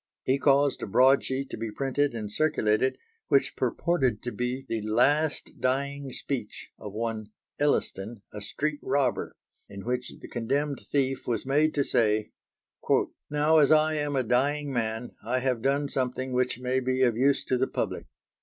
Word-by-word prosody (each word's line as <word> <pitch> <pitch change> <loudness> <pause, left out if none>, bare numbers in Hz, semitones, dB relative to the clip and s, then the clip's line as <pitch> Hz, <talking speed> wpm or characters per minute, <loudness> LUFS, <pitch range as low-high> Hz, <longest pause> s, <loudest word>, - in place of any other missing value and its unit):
He 135 +2 +1
caused 140 0 +3
a - - -3
broad 130 +6 +5
sheet 130 +1 -3
to - - -4
be 115 0 -4
printed 135 +3 0
and 105 -2 -5
circulated 130 -3 +1 0.3
which - - +2
purported 135 -11 0
to 120 - -3
be 125 +2 -3
the 115 -2 -2
"last 140 +9 +1
dying 140 +2 -1
speech" 125 -5 -5
of 105 - -7
one 110 0 -3 0.3
Elliston, 115 -7 -1
a 105 - -6
street 145 +8 -2
robber, 140 -3 0 0.3
in 100 0 -9
which 125 +1 -2
the - - -10
condemned 140 +4 -1
thief 135 -2 -1
was 115 -1 -1
made 150 +3 +2
to 145 - +2
say: 110 -4 +1 1.0
"Now 150 +2 +4
as 145 -1 +5
I 155 0 +5
am 145 -2 -1
a 130 - +2
dying 140 +4 +1
man, 115 0 -2
I 120 +4 0
have 130 -2 0
done 140 +3 +1
something 130 -1 -2
which 125 -1 +1
may 130 +1 0
be 130 0 +1
of 120 -3 +3
use 135 +4 +2
to 130 - 0
the 130 - +2
public. - - -3
130 Hz, 170 wpm, -27 LUFS, 115-140 Hz, 1.0 s, broad